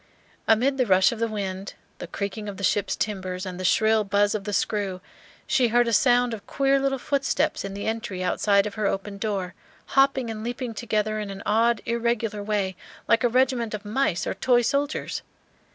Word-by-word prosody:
Amid 255 +5 +3
the 255 - +2
rush 190 -1 +5
of 235 - -6
the 230 - +1
wind, 195 -3 -5 0.2
the - - -6
creaking 200 +3 -4
of 195 - -7
the 200 - -7
ship's 200 -1 +1
timbers, 185 -3 -3
and 185 -1 -6
the - - -4
shrill 220 +3 +3
buzz 205 +1 +2
of 210 -3 -3
the 205 - -3
screw, 200 -2 -1 0.5
she 250 -2 +3
heard 240 +1 +3
a 230 - 0
sound 245 +1 +4
of 210 -3 -8
queer 275 0 +2
little 270 0 0
footsteps 280 +1 0
in 195 0 -5
the 200 - -5
entry 220 -4 -3
outside 200 +2 +2
of 210 - -4
her 210 -1 -1
open 200 +1 -3
door, 195 -4 -2 0.4
hopping 270 -3 +3
and 215 -1 -6
leaping 240 0 -4
together 215 -1 -1
in 210 -1 -4
an 195 0 -7
odd 225 +1 +2
irregular 235 -2 -1
way, 200 -2 -1 0.3
like 230 +1 +3
a 245 - +4
regiment 245 -3 +1
of 210 0 -9
mice 205 -6 0
or - - -1
toy 240 +4 +2
soldiers. 285 +4 -1
215 Hz, 200 wpm, -25 LUFS, 200-240 Hz, 0.5 s, rush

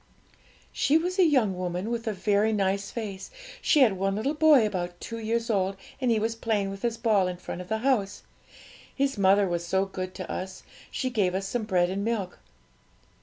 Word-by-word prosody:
'She 295 - +3
was 360 +4 -2
a - - +7
young 255 - +3
woman 180 +4 -3
with 235 -1 -3
a - - +2
very 205 +2 +1
nice 195 -1 0
face; 205 -5 -6 0.3
she 300 - +4
had 235 -6 +6
one 195 +1 -1
little 230 +8 -1
boy 300 -6 +5
about 175 -4 -3
two 230 0 -6
years 230 +1 -1
old, 195 -3 0 0.2
and 255 - +1
he 230 - +3
was 225 +1 0
playing 215 -4 -1
with 195 0 -8
his 235 -1 -1
ball 210 -6 +2
in 180 -1 -4
front 180 - -6
of 180 - -11
the 220 - 0
house. 210 -8 +1 0.7
His 275 0 0
mother 195 0 +4
was 175 -1 -2
so 190 +3 +1
good 185 -1 -6
to 185 -2 -6
us 190 0 -6 0.3
she 255 -1 -2
gave 195 -6 +1
us 195 0 -2
some 230 +1 -2
bread 180 -3 +2
and 200 +1 -2
milk.' 210 -5 -2
205 Hz, 205 wpm, -27 LUFS, 190-230 Hz, 0.7 s, a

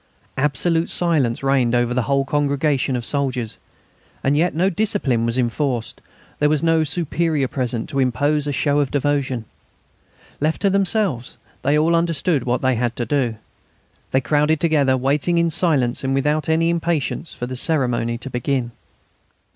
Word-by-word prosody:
Absolute 165 +4 +1
silence 145 -9 0
reigned 130 -3 +2
over 120 0 +1
the 125 - +1
whole 140 +2 +1
congregation 140 -2 0
of 120 -1 -3
soldiers. 130 -5 -2 0.7
And 140 +2 +2
yet 170 +3 +1
no 180 +4 +2
discipline 160 - 0
was 115 +1 -1
enforced; 125 -1 -1 0.4
there 150 - +3
was 150 0 +1
no 165 -1 +3
superior 155 -2 0
present 125 -3 -3
to 140 -3 -2
impose 145 +3 +1
a - - 0
show 145 +2 +1
of 140 -2 +1
devotion. 140 -4 -1 0.9
Left 155 +2 0
to 200 - +3
themselves, 195 - 0 0.2
they 145 +3 +2
all 165 +2 +3
understood 165 -4 +1
what 125 +1 -1
they 130 0 +3
had 120 0 -1
to 120 - -2
do. 125 -2 0 0.7
They 130 - +2
crowded 150 +4 +2
together, 145 -6 +2
waiting 145 +6 +1
in 170 0 +2
silence 140 -8 +1
and 135 0 0
without 150 +3 0
any 165 +1 +2
impatience 170 -1 -2
for 125 - -4
the 130 +1 -5
ceremony 125 -5 0
to 135 - -7
begin. 125 0 -1
140 Hz, 160 wpm, -21 LUFS, 125-160 Hz, 0.9 s, there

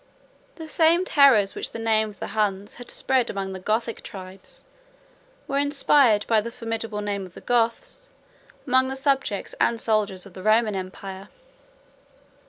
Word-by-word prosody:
115 320 - -8
The 310 - -11
same 335 +2 +4
terrors 260 - +5
which - - -5
the - - -5
name 220 -1 +1
of 205 - -14
the - - -6
Huns 205 -2 -1
had 245 - -11
spread 260 -2 0
among 195 -1 -4
the 190 - -6
Gothic 220 +4 -2
tribes, 190 -1 -11 0.8
were 275 0 0
inspired, 280 -6 +3
by 220 -2 +3
the 230 - -5
formidable 225 -2 -4
name 200 -1 -3
of 185 -1 -12
the - - -9
Goths, 245 - -1 0.6
among 260 -1 +3
the 265 - -4
subjects 270 -7 -1
and 235 - +2
soldiers 210 -5 0
of 195 - -14
the 185 - -9
Roman 215 +1 +3
empire. 190 +1 -7
220 Hz, 165 wpm, -24 LUFS, 200-260 Hz, 0.8 s, terrors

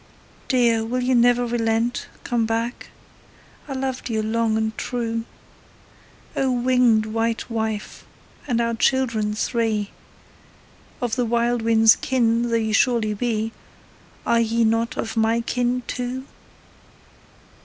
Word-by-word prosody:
Dear, 235 -4 +3
will 250 +3 -2
you 255 +1 +2
never 245 0 +4
relent, 230 0 0 0.2
come 235 -2 0
back? 230 +2 -3 0.8
I 275 - -4
loved 260 -1 -3
you 220 -1 -1
long 220 0 +1
and 220 0 -1
true. 230 -2 -3 1.1
O 270 - +1
winged 245 -3 +3
white 225 +2 -2
wife, 220 -2 -3 0.4
and 240 -4 +1
our 235 0 0
children 230 -4 +1
three, 220 -2 -1 1.1
Of 240 -3 -1
the 245 - +1
wild 235 +1 +1
wind's 225 -1 +5
kin 235 -2 +1
though 230 - +1
you 220 -1 0
surely 225 -2 +2
be, 220 0 -1 0.7
Are 235 - +3
ye 230 0 +1
not 225 +1 +1
of 225 - -3
my 225 +1 +2
kin 245 +1 -1
too? 250 +1 -4
230 Hz, 125 wpm, -22 LUFS, 225-245 Hz, 1.1 s, wind's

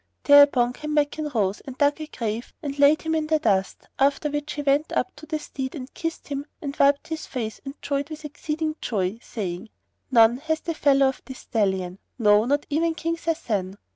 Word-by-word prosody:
Thereupon 285 -4 +6
Kanmakan 300 +1 -1
rose 200 -2 +1
and 265 -1 -9
dug 290 +2 +2
a 310 - -5
grave 230 -4 -4
and 285 -1 -4
laid 285 +2 +5
him 320 0 -1
in 315 -1 0
the 315 0 +3
dust; 195 -9 0
after 280 +2 +2
which 295 +1 -3
he 290 - -4
went 285 +2 +2
up - - -1
to 310 +1 -12
the 310 0 -1
steed 265 -2 -6
and 265 -2 -8
kissed 330 -1 -5
him 280 0 -4
and 280 -2 -5
wiped 280 +2 +3
his 320 -1 -5
face 225 -4 -5
and 275 +1 -8
joyed 280 +1 -2
with 310 -1 -8
exceeding 305 +1 -3
joy, 200 -1 -1
saying, 195 -2 -5 0.4
"None 235 -2 +6
hath 315 +3 -2
the 335 - -2
fellow 275 -3 +4
of 265 - -7
this 260 -1 -9
stallion; 190 -4 -1 0.2
no, 210 -2 +4
not 285 +3 +1
even 325 +2 +1
King 330 +1 -2
Sasan." 220 - -2
280 Hz, 200 wpm, -24 LUFS, 230-305 Hz, 0.4 s, Thereupon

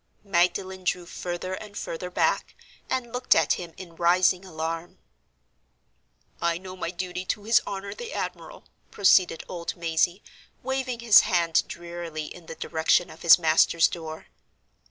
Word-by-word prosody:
Magdalen 185 0 0
drew 180 -1 -1
further 175 +1 -5
and 205 +1 -8
further 180 +2 -5
back, 180 - 0 0.3
and 245 -2 -2
looked 250 +1 +3
at - - +3
him 175 -2 -6
in 175 -3 -11
rising 180 +2 +3
alarm. 165 -1 -5 1.4
"I 170 0 +1
know 185 +1 -9
my 180 -2 -4
duty 180 +1 -5
to 205 - -3
his 225 +2 +4
honor 200 0 -5
the 480 0 -8
admiral," - - -6 0.3
proceeded 185 -4 +3
old 170 -2 -5
Mazey, 170 +3 0 0.4
waving 260 -2 -2
his 230 -3 +8
hand 170 -5 +2
drearily 170 -2 -6
in 170 +1 -11
the 165 - -7
direction 160 +2 +1
of 160 - -14
his 170 - +8
master's 165 0 +4
door. 160 -2 -7
180 Hz, 145 wpm, -26 LUFS, 170-195 Hz, 1.4 s, his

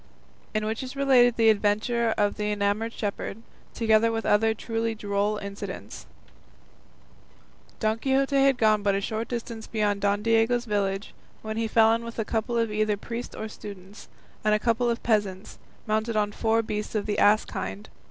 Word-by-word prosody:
IN 215 0 0
WHICH 220 +1 -2
IS 260 +1 -7
RELATED 255 -4 +4
THE 225 -1 +5
ADVENTURE 220 +3 +1
OF 205 0 +2
THE 210 0 -2
ENAMOURED 205 +2 0
SHEPHERD, 205 +1 -4 0.3
TOGETHER 225 0 +3
WITH 225 -1 -3
OTHER 220 +1 +3
TRULY 225 0 -2
DROLL 205 0 -1
INCIDENTS 200 -1 -7 1.7
Don 220 0 0
Quixote 270 +2 +1
had 275 -2 +4
gone 215 -2 +3
but 200 -1 +1
a - - +1
short 220 +3 -3
distance 230 -2 -5
beyond 205 -2 0
Don 200 +1 +1
Diego's 230 +2 +2
village, 200 -2 -2 0.3
when 220 0 -4
he 225 0 0
fell 225 0 +5
in 230 +1 -1
with 230 0 -8
a 225 - -1
couple 230 +2 -1
of 230 -2 +1
either 210 -1 +1
priests 235 +3 -6
or 220 - -5
students, 200 -2 -11 0.4
and 215 0 +3
a - - 0
couple 235 +2 +1
of 235 0 -2
peasants, 205 -3 -1 0.3
mounted 220 +1 -1
on 210 -1 +1
four 225 +2 +1
beasts 210 0 -4
of 210 - 0
the 210 - -1
ass 210 +1 +5
kind. 95 +2 -6
220 Hz, 175 wpm, -26 LUFS, 205-230 Hz, 1.7 s, THE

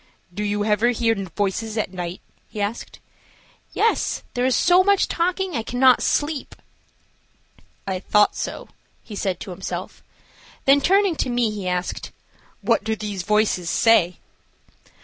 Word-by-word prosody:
"Do 205 +3 -3
you 205 0 -1
ever 215 +2 +2
hear 230 -1 +1
voices 205 +3 -3
at 205 -3 -2
night?" 175 0 -5 0.3
he 215 - -8
asked. 205 +3 -4 0.7
"Yes, 455 - 0
there 245 0 +1
is 260 - +2
so 360 +1 +5
much 400 0 +3
talking 365 +2 -1
I 230 - 0
cannot 250 +2 +4
sleep." 290 -1 -1 1.3
"I 190 -1 -2
thought 210 +2 +3
so," - - -5 0.3
he 215 - -9
said 190 -3 -2
to 195 - -7
himself. 185 +2 -6 0.6
Then 275 +1 +5
turning 390 +1 +3
to - - -1
me, 240 -2 +1
he 205 -3 -5
asked: 180 0 -3 0.5
"What - - +1
do 220 +1 -1
these 205 -3 -4
voices 205 -3 +1
say?" 180 -7 +3
215 Hz, 145 wpm, -22 LUFS, 195-255 Hz, 1.3 s, so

